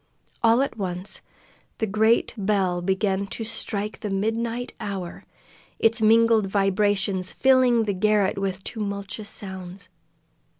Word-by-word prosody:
All 230 +3 +4
at 275 - -4
once 185 0 -3 0.6
the 220 - 0
great 220 +3 +2
bell 195 -4 0
began 190 +1 0
to 225 - -5
strike 215 -1 -3
the 210 - -4
midnight 225 +4 -2
hour, 195 -5 -5 0.5
its 225 +1 +2
mingled 225 -1 +5
vibrations 195 -1 +1
filling 255 -3 +4
the 205 -2 -1
garret 205 0 +2
with 190 -1 -3
tumultuous 200 -1 -5
sounds. 190 -2 -8
205 Hz, 120 wpm, -24 LUFS, 195-225 Hz, 0.6 s, mingled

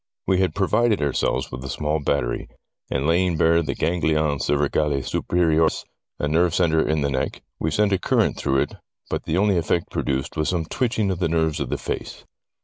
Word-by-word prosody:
We 95 -1 +2
had 90 -4 +1
provided 105 +2 +2
ourselves 70 -3 0
with 65 +1 -6
a 70 - -6
small 75 +4 -1
battery, 70 -4 -1 0.4
and, 70 0 -1
lay 85 +4 +3
ing 90 -3 0
bare 85 +1 +4
the 80 - -3
ganglion 80 -3 +1
cervicale 75 -1 +1
superius, 80 -2 +1 0.3
a 75 - -1
nerve 85 +3 +2
centre 80 -3 +3
in 75 -1 +1
the 70 0 0
neck, 65 -1 -2 0.2
we 80 - 0
sent 100 +5 +2
a 95 - +2
current - - +1
through 70 -1 +1
it, - - -2 0.4
but - - -2
the 80 - 0
only 100 -2 +3
effect 85 0 -1
produced 65 -1 -2
was 75 - 0
some 85 -3 -1
twitching 110 0 0
of 90 - -3
the 85 -3 +1
nerves 80 -1 +1
of 70 -4 -3
the - - -1
face. - - -5
80 Hz, 200 wpm, -23 LUFS, 75-90 Hz, 0.4 s, bare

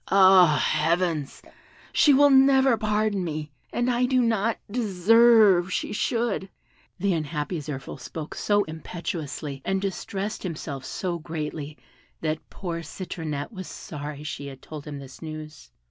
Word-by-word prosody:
Ah, 185 -5 +7
heavens! 165 -2 0 0.5
she 295 - +6
will 285 +1 +6
never 265 -1 +6
pardon 210 -2 0
me, 155 -3 -4 0.2
and 240 - 0
I 250 0 +2
do 255 0 +2
not 225 -1 +1
deserve 215 -3 +5
she - - -2
should!" 230 -3 -1 0.5
The 195 +1 +1
unhappy 155 +1 -2
Zirphil 140 -3 -6
spoke 160 -2 -7
so 205 0 +2
impetuously, 155 -3 -5
and 195 0 0
distressed 195 +1 -4
himself 150 -6 -5
so 175 +2 -3
greatly, 155 -2 -5 0.4
that 155 -1 -3
poor 170 -3 -5
Citronette 160 -2 -5
was 185 -4 -7
sorry 150 -1 -7
she 145 -1 -5
had 135 -1 -9
told 150 -2 -8
him 145 -1 -5
this 135 -2 -11
news. 155 -1 -8
175 Hz, 135 wpm, -25 LUFS, 150-210 Hz, 0.5 s, Ah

